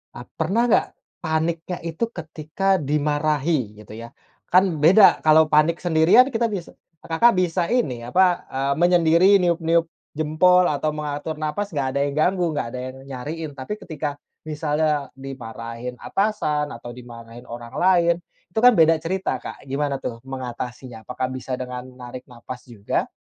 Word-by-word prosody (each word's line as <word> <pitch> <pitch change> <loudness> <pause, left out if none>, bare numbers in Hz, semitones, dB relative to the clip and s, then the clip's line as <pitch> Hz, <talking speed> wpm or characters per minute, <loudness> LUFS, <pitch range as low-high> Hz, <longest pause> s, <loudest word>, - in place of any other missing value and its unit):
eee, 120 - -9
pernah 190 +9 +1
enggak, - - +4 0.4
paniknya 165 +2 -1
itu 165 +6 -4
ketika 165 +2 -2
dimarahi, 145 -5 0
gitu 105 - -15
ya. 115 +1 -9 0.4
Kan 185 -3 +3
beda 190 +5 +7
kalau 155 0 +6
panik 155 +2 +3
sendirian 175 +9 +5
kita 230 0 +1
bisa 185 -5 -5 0.3
Kakak 230 +9 +3
bisa 180 0 +1
ini, 130 - 0
apa, 180 +8 +2
eee 135 +1 0
menyendiri, 175 +3 +4
niup-niup 170 -2 +1 0.2
jempol 170 +4 +3
atau 150 +1 -1
mengatur 150 +1 -5
nafas, 155 +7 -3
enggak 140 -4 -1
ada - - +1
yang 145 - -1
ganggu, 180 +3 +2
enggak 145 -5 -2
ada - - -4
yang 130 - -14
nyariin. 150 +4 -6
Tapi 130 +8 -5
ketika 150 -4 -5 0.2
misalnya 150 -1 -1
dimarahin 125 -2 -7
atasan, 195 -8 0
atau 120 +1 -9
dimarahin 120 0 -12
orang 120 0 -8
lain, 175 -2 +4 0.4
itu 220 - -1
kan 250 +1 +7
beda 165 -2 +5
cerita, 185 +4 -2
Kak. - - -9
Gimana 140 +1 -1
tuh 115 -2 -5
mengatasinya? 125 -2 -7
Apakah 130 +1 -2
bisa 130 0 -4
dengan 125 0 -6
narik 125 0 -10
nafas 125 0 -10
juga? 110 -4 -3
155 Hz, 150 wpm, -22 LUFS, 130-170 Hz, 0.4 s, beda